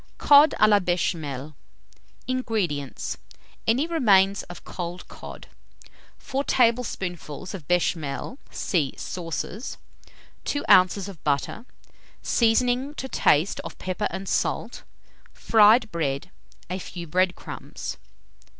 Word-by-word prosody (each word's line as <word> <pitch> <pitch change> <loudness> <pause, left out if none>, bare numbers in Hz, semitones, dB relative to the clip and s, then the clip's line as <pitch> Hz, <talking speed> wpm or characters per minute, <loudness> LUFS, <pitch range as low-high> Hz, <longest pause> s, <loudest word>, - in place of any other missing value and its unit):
COD 290 +1 +6
A 215 - +7
LA 205 -1 +5
BECHAMEL. 155 -6 -2 0.7
239. 255 0 0
INGREDIENTS. 175 - -2 0.5
Any 245 +7 +3
remains 200 - +4
of 175 - -10
cold 175 0 -6
cod, - - -10 0.7
4 275 +1 -3
tablespoonfuls 195 - 0
of 170 -8 -8
béchamel 175 - -1
(see 155 -8 -1
Sauces), 180 - -5 0.7
2 285 - -2
oz. 185 +1 +5 0.2
butter; 150 - -1 0.6
seasoning 250 +4 +2
to 265 - -5
taste 165 - +2
of - - -7
pepper 185 +3 -2
and 195 0 -6
salt; - - -1 0.5
fried 220 +1 +5
bread, 150 0 -2 0.4
a 185 +2 -4
few 175 -1 -7
bread 180 +3 +1
crumbs. - - -7
190 Hz, 105 wpm, -25 LUFS, 170-230 Hz, 0.7 s, A